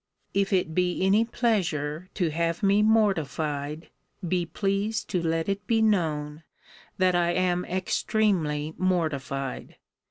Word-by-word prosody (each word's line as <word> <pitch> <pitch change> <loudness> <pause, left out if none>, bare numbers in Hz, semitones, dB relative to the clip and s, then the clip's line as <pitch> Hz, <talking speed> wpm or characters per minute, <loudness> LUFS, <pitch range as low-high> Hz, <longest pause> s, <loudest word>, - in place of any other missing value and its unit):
If 200 0 +1
it 180 -4 +1
be 180 +1 +1
any 205 +4 +4
pleasure 180 - -1
to 175 -5 0
have 170 +4 -1
me 200 +1 +4
mortified, 160 -8 0 0.4
be 175 0 0
pleased 200 +4 -1
to 180 -3 +1
let 165 0 -1
it 200 +1 -3
be 225 -1 +2
known, 155 -8 0 0.6
that 185 -2 +3
I 175 0 +2
am 180 0 +1
extremely 180 -5 0
mortified. 140 -7 -2
180 Hz, 125 wpm, -26 LUFS, 155-200 Hz, 0.6 s, any